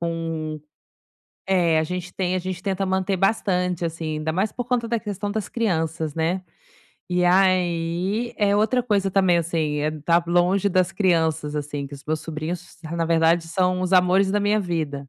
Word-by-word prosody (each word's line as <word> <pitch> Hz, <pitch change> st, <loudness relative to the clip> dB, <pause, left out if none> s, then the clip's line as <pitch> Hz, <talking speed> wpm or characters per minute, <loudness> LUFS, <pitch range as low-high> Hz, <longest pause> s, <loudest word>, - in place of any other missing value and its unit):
com 165 Hz, -2 st, -3 dB, 0.9 s
eh, 175 Hz, -4 st, +3 dB
a -, -, +2 dB
gente 180 Hz, +1 st, -5 dB
tem 185 Hz, -1 st, -1 dB
a -, -, +1 dB
gente 185 Hz, 0 st, -5 dB
tenta 195 Hz, -1 st, -1 dB
manter 190 Hz, +1 st, 0 dB
bastante, 180 Hz, -4 st, +1 dB
assim, 160 Hz, -1 st, -3 dB
ainda 155 Hz, +1 st, -2 dB
mais 195 Hz, +5 st, 0 dB
por 245 Hz, -, -4 dB
conta 240 Hz, -2 st, 0 dB
da 235 Hz, 0 st, 0 dB
questão 205 Hz, -1 st, -4 dB
das 215 Hz, -2 st, -3 dB
crianças, 160 Hz, -8 st, -1 dB
né. 170 Hz, +3 st, 0 dB, 0.7 s
E 180 Hz, 0 st, +2 dB
aí 185 Hz, +4 st, +1 dB
eh, 205 Hz, -1 st, +3 dB
outra 240 Hz, +4 st, +2 dB
coisa 200 Hz, -4 st, +1 dB
também, 185 Hz, -3 st, +4 dB
assim, 160 Hz, -3 st, -1 dB
eh, 155 Hz, +1 st, 0 dB
tá 170 Hz, 0 st, +4 dB
longe 180 Hz, +3 st, +2 dB
das 185 Hz, 0 st, +2 dB
crianças, 160 Hz, -6 st, +1 dB
assim, 145 Hz, -1 st, -4 dB
que 140 Hz, -, -10 dB
os 140 Hz, -, -12 dB
meus 155 Hz, +1 st, -1 dB
sobrinhos 160 Hz, +2 st, -4 dB
s 170 Hz, -1 st, -9 dB
na 165 Hz, -, +1 dB
verdade 165 Hz, 0 st, +3 dB
são 185 Hz, +1 st, +1 dB
os 185 Hz, +1 st, -2 dB
amores 185 Hz, +1 st, +4 dB
da 205 Hz, +1 st, +1 dB
minha 205 Hz, +1 st, +2 dB
vida. 155 Hz, -6 st, -3 dB
180 Hz, 185 wpm, -23 LUFS, 165-195 Hz, 0.9 s, também